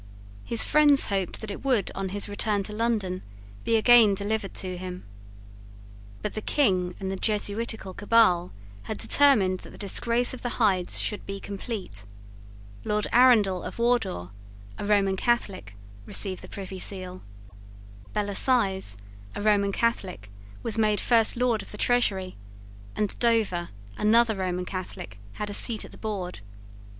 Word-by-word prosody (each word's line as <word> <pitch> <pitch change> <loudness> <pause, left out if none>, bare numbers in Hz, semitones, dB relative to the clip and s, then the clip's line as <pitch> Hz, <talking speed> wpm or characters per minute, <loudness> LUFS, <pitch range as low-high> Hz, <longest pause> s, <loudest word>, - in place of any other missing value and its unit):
His 230 - +2
friends 290 -2 +5
hoped 195 -3 -2
that 220 -2 -6
it 200 - -8
would, 255 -7 +1
on 195 -1 -4
his 200 +2 -3
return 205 0 0
to 210 - -4
London, 210 -5 -1 0.4
be 230 - +1
again 225 -2 +6
delivered 205 0 -2
to 185 -1 -2
him. 180 0 -7 1.2
But 210 - -3
the 215 - -4
King 185 -10 +1
and 190 -1 -4
the - - -3
Jesuitical 210 0 -2
cabal 200 -4 +3 0.3
had 220 - -4
determined 210 -11 +4
that - - -13
the - - -13
disgrace 235 +5 +1
of 255 - -8
the 245 - -4
Hydes 190 -6 +2
should 210 - -1
be 195 0 -5
complete. 195 - -6 0.8
Lord 210 0 -1
Arundell 220 -7 +5
of - - -7
Wardour, 235 - 0 0.5
a - - -4
Roman 200 -2 +2
Catholic, 195 - -1 0.3
received 190 -3 +1
the - - -11
Privy 190 -1 -7
Seal. 185 -1 -6 0.9
Bellasyse, 200 - +2 0.4
a - - -4
Roman 205 -2 +2
Catholic, 190 - -2 0.3
was 225 -1 -2
made 210 -2 +2
First 230 -1 +3
Lord 240 -3 +1
of - - -12
the 210 - -8
Treasury; 200 -6 +1 0.6
and 210 -2 -2
Dover, 220 -7 +1 0.3
another 225 +1 +4
Roman 180 -1 -3
Catholic, 175 - -7
had 210 -1 -5
a - - -5
seat 220 +1 0
at - - -13
the - - -13
board. 190 - -5
205 Hz, 150 wpm, -26 LUFS, 185-230 Hz, 1.2 s, again